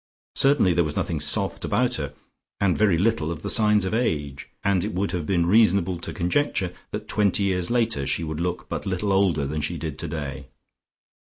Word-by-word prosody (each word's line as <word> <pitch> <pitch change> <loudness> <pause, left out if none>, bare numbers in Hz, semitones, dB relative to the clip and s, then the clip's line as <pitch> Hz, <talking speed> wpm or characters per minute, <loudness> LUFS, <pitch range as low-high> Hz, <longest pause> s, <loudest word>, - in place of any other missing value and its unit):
Certainly 135 -10 +4
there 85 0 +3
was 75 -2 -4
nothing 80 - -1
soft 75 0 0
about - - +1
her, - - -5 0.4
and 95 -3 +2
very 100 -6 +3
little 95 -4 +1
of 85 - -6
the - - 0
signs 105 -2 +3
of 95 - -2
age, 75 - -2
and 100 -3 +2
it - - -3
would 95 +2 -1
have 85 -5 -3
been 85 -3 +2
reasonable 95 -3 +3
to - - -6
conjecture 95 0 0 0.2
that - - -6
twenty 105 -1 +1
years 90 -3 0
later 115 - +1
she 70 +5 0
would 80 -1 -4
look 90 +1 -3
but - - -4
little 95 +2 -1
older 95 -7 +2
than 75 +2 -3
she 85 +4 -2
did 75 -2 -5
today. 70 -3 -5
90 Hz, 195 wpm, -24 LUFS, 80-100 Hz, 0.4 s, Certainly